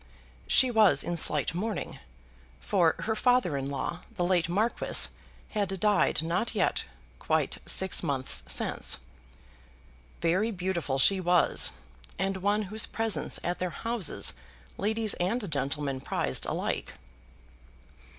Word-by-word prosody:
She 260 -1 +5
was 220 -4 +4
in 175 - -2
slight 150 -2 +1
mourning; 205 +3 -4 0.6
for 160 - +2
her 220 - 0
father 245 - +2
in 135 0 -3
law, 140 +5 -3 0.2
the 180 - -1
late 175 -2 +1
Marquis, 215 +7 +2 0.4
had 195 -3 -2
died 205 -6 +2
no 170 +4 0
t - - -4
yet - - +1 0.3
quite - - 0
six 190 0 +1
months 140 -5 0
since. - - 0 1.2
Very 185 +7 +1
beautiful 180 -8 -2
she 190 +8 +5
was, 175 -1 +3 0.5
and 195 0 -1
one 205 +3 +1
whose 215 +3 +2
presence 220 -9 -2
at 175 +1 -2
their 180 - -1
houses 230 -2 0 0.4
ladies 220 +1 0
and 200 +2 -1
gentlemen 140 -1 -2
prized 65 - -2
alike. - - -3
185 Hz, 125 wpm, -28 LUFS, 160-215 Hz, 1.2 s, She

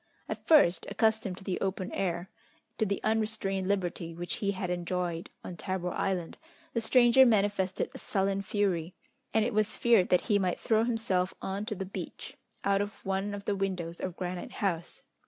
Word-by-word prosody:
At - - -6
first, 185 - +5
accustomed 220 -4 +1
to - - -10
the 190 -1 -2
open 190 +1 -2
air, 180 -1 -2 0.5
to 220 - +2
the 200 0 -2
unrestrained 215 -4 0
liberty 175 -4 -1
which 175 +1 -3
he 200 - -1
had 185 -2 -3
enjoyed 175 -1 -2
on 180 - -6
Tabor 185 -2 -2
Island, 185 -4 -2 0.3
the 230 - 0
stranger 240 +2 +6
manifested 200 -5 +2
a - - -8
sullen 195 0 0
fury, 190 -4 -1 0.4
and 220 -1 +3
it 245 - -1
was 215 0 +1
feared 230 -6 +4
that 180 - +4
he 205 -3 +2
might 185 -2 0
throw 220 0 +2
himself 195 -6 0
on 200 +2 -3
to 215 - -2
the 190 - -4
beach, 185 - -7 0.3
out 200 0 +3
of 205 +1 -6
one 195 +1 -1
of 200 0 -8
the 205 - +1
windows 180 -4 -2
of 185 -2 -4
Granite 180 -1 -4
House. 175 -5 -2
195 Hz, 180 wpm, -30 LUFS, 180-210 Hz, 0.5 s, stranger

